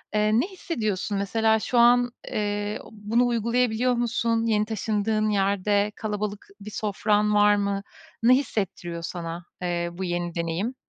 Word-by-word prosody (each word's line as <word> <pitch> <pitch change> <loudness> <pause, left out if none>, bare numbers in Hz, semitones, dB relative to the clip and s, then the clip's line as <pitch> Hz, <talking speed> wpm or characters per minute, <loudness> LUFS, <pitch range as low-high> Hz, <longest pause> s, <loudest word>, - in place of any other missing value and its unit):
Eee, 210 0 +3
ne 330 - +1
hissediyorsun 215 - -3
mesela 220 +3 +2
şu 245 - -1
an, 245 +1 +5 0.2
eee, 205 0 -2
bunu 220 +3 +1
uygulayabiliyor 240 +1 +1
musun? 230 -1 0
Yeni 215 -2 +2
taşındığın 215 0 0
yerde 200 +1 +1
kalabalık 210 -1 -4
bir 210 +1 -8
sofran 210 0 +1
var 205 0 +5
mı? 200 -1 -1 0.4
Ne 250 +2 +7
hissettiriyor 190 -9 -3
sana, 170 0 -5 0.2
eee, 175 -1 -1
bu 185 +2 -5
yeni 175 -1 -2
deneyim? 170 +9 -2
210 Hz, 140 wpm, -25 LUFS, 200-230 Hz, 0.4 s, Ne